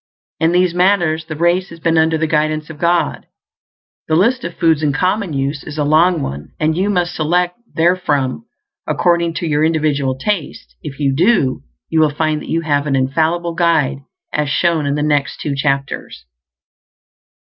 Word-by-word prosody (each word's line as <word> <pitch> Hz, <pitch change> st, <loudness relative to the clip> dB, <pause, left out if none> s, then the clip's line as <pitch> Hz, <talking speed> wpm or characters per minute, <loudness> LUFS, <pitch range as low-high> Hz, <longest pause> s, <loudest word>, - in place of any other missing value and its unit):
In 160 Hz, +1 st, +2 dB
these 180 Hz, 0 st, +2 dB
matters 175 Hz, -3 st, +2 dB
the 155 Hz, -1 st, -6 dB
race 175 Hz, +4 st, +1 dB
has 170 Hz, -, -12 dB
been 165 Hz, 0 st, +1 dB
under 160 Hz, 0 st, +3 dB
the 160 Hz, -, 0 dB
guidance 155 Hz, 0 st, -1 dB
of 150 Hz, -, -12 dB
God. 170 Hz, +1 st, 0 dB, 0.8 s
The 155 Hz, -, +1 dB
list 235 Hz, +9 st, +2 dB
of 170 Hz, -, -5 dB
foods 160 Hz, -2 st, +2 dB
in 150 Hz, -2 st, +1 dB
common 185 Hz, +4 st, 0 dB
use 140 Hz, +1 st, -2 dB
is 150 Hz, -, -8 dB
a 150 Hz, -, +1 dB
long 160 Hz, +2 st, +3 dB
one, 70 Hz, +2 st, -6 dB
and 155 Hz, 0 st, +1 dB
you 190 Hz, +4 st, 0 dB
must 175 Hz, -3 st, 0 dB
select 175 Hz, +5 st, 0 dB, 0.2 s
therefrom 150 Hz, -, 0 dB, 0.4 s
according 170 Hz, -1 st, +1 dB
to 170 Hz, -, -3 dB
your 150 Hz, 0 st, +1 dB
individual 150 Hz, -4 st, 0 dB
taste; 140 Hz, -, -4 dB
if 135 Hz, -, -8 dB
you 140 Hz, -2 st, +1 dB
do, 165 Hz, -, +2 dB, 0.3 s
you 160 Hz, -, 0 dB
will 155 Hz, -1 st, +4 dB
find 155 Hz, +1 st, -1 dB
that -, -, -10 dB
you 165 Hz, -, 0 dB
have 145 Hz, -2 st, 0 dB
an 140 Hz, -, +1 dB
infallible 160 Hz, +6 st, 0 dB
guide, 160 Hz, -5 st, +1 dB, 0.3 s
as 150 Hz, -1 st, 0 dB
shown 160 Hz, 0 st, +1 dB
in 140 Hz, -, 0 dB
the 150 Hz, -, -1 dB
next 145 Hz, -2 st, 0 dB
two 145 Hz, -, -2 dB
chapters. 140 Hz, -, -2 dB
160 Hz, 180 wpm, -17 LUFS, 145-175 Hz, 0.8 s, will